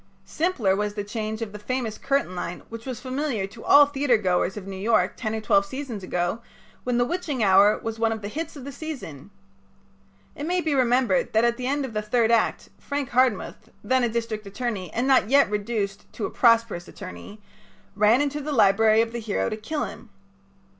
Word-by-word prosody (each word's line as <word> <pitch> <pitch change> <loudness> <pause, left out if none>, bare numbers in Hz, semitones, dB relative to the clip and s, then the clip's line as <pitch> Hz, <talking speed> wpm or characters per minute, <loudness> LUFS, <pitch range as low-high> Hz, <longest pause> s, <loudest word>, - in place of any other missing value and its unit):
Simpler 285 - 0
was 210 +1 -2
the 205 - -3
change 215 +1 -4
of 215 - -7
the 210 - -9
famous 235 0 -3
curtain 275 -9 0
line 175 0 -5
which 230 +2 -9
was 255 -2 -4
familiar 255 -4 -2
to 215 +4 -12
all 290 0 +7
theatergoers 225 -10 +1
of 200 - -7
New 195 0 -6
York 215 +4 +1
ten 220 -2 -3
or 220 - -3
twelve 200 -2 +3
seasons 240 0 -6
ago 180 +4 -2 0.4
when 250 -1 0
"The 245 - +3
Witching 295 -6 -2
Hour" 200 +2 +5
was 225 0 -4
one 225 0 +2
of 220 -2 -4
the - - -3
hits 315 +9 -5
of 270 -3 -9
the 280 - -6
season. 250 - -8 1.1
It 290 - -5
may 360 +1 +1
be 315 -4 0
remembered 245 -5 +2
that 220 +1 +4
at 235 0 +2
the 250 - -3
end 285 +1 0
of 245 - -8
the 215 - -1
third 225 +2 +1
act 230 -2 +1
Frank 285 -2 -3
Hardmuth, 240 -3 0
then 260 0 +2
a 240 - +2
district 225 -2 -3
attorney 200 -4 -4
and 245 +3 -1
not 260 -5 +4
yet 275 -5 +4
reduced 205 -1 -3
to 220 - -3
a - - -4
prosperous 230 -7 +3
attorney, 205 +2 -10 0.6
ran 215 +6 +4
into 290 +1 -1
the 300 +2 -4
library 220 -2 +4
of 230 - -6
the 235 - -4
hero 215 -2 -1
to - - -3
kill 290 +8 -3
him. 240 - -10
230 Hz, 205 wpm, -25 LUFS, 210-260 Hz, 1.1 s, all